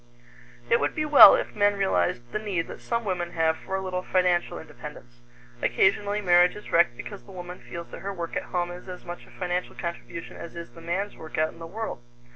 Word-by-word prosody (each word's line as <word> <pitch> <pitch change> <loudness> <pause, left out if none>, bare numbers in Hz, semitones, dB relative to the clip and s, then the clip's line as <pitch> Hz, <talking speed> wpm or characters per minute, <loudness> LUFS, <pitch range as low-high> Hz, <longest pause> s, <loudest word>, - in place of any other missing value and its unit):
It 235 - +4
would - - -1
be 305 - 0
well 295 -2 +10
if - - -3
men 205 -1 +3
realized 120 - 0
the 215 - -1
need 195 -6 -2
that - - -9
some 235 -1 -2
women 175 -3 -2
have 160 -1 +2
for 190 - -5
a 190 - -1
little 185 -1 -2
financial 180 -1 +1
independence. 120 -6 -11 0.4
Occasionally 205 +2 +2
marriage 180 -1 +5
is 210 - -10
wrecked 165 -8 +4
because 205 +8 -8
the - - -15
woman 180 -1 -8
feels 170 0 -8
that - - -8
her 200 - -3
work 170 -4 -5
at - - -2
home 175 -1 -1
is 180 +1 -10
as 180 -1 -8
much 175 0 -8
a - - -17
financial 180 -1 -3
contribution 170 -1 -6
as 170 - -9
is 170 0 -7
the 165 - -13
man's 185 +5 -2
work 160 - -8
out 155 0 +1
in - - -16
the 165 - -7
world. 215 - -5
180 Hz, 225 wpm, -26 LUFS, 170-195 Hz, 0.4 s, well